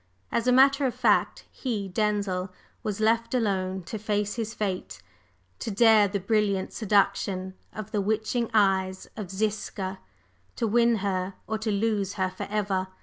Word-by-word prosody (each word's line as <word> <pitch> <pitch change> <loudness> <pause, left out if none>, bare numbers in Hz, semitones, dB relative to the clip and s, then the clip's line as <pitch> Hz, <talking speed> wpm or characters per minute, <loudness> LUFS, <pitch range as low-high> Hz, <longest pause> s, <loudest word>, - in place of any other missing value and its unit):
As 235 +1 0
a - - +5
matter 275 +2 +5
of 250 - -3
fact, - - +2
he, 220 -7 -3
Denzil, 195 -2 -1 0.3
was 210 -1 -3
left 230 +3 +2
alone 190 -5 0
to 215 +5 -6
face 210 -1 -1
his 225 -2 -3
fate: 185 - -3 0.6
to - - -4
dare 220 0 +5
the 200 +1 -2
brilliant 200 -1 0
seduction 195 -3 +1 0.2
of 215 -1 -7
the 205 - 0
witching 220 +3 0
eyes 190 -3 +2
of 210 -5 -6
Ziska, 195 -1 -3 0.6
to - - -1
win 235 +1 +4
her 185 -1 -1
or 220 0 -2
to 220 0 -2
lose 205 -1 0
her 185 -2 -1
forever! 195 -3 -2
210 Hz, 150 wpm, -27 LUFS, 190-220 Hz, 0.6 s, a